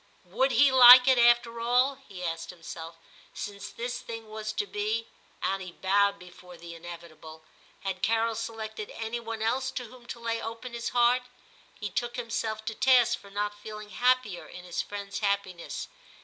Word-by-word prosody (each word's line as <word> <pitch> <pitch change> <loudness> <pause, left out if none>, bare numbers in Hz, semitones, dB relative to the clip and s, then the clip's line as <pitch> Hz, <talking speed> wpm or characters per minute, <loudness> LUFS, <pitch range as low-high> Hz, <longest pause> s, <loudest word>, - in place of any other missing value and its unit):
' - - -33
Would 230 +9 +1
he 270 +3 +6
like 250 0 +10
it 260 -2 +5
after 235 -1 +4
all,' 250 +4 +3 0.2
he 185 -2 -8
asked 165 -1 -3
himself, 165 -1 -9 0.2
* - - -25
since 205 0 -8
this 240 +1 -4
thing 225 -1 -8
was 215 0 -4
to 415 - -1
be 425 +3 -2 0.2
' - - -21
(and 195 0 0
he 180 -2 -8
bowed 200 +2 +2
before 180 0 -14
the 170 0 -10
inevitable), 165 -2 -11 0.4
*had 190 -1 -4
Carol 225 +1 +2
selected 220 -1 -5
any 225 +1 -3
one 225 -1 -5
else 255 +4 0
to 255 -1 -5
whom 240 +1 -15
to 235 - -7
lay 230 0 -2
open 230 +2 -7
his 235 0 -3
heart 245 +1 +3
V - - -21 0.6
He - - -1
took 240 +5 -2
himself 225 -2 -3
to 225 - -2
task 245 0 +4
for 200 - -15
not 205 +1 -3
feeling 215 -1 -9
happier 250 -7 +1
in 180 - -10
his 175 -1 -3
friend 200 -1 -7
s 200 - -4
happiness. 200 -4 -2
220 Hz, 190 wpm, -28 LUFS, 195-240 Hz, 0.6 s, like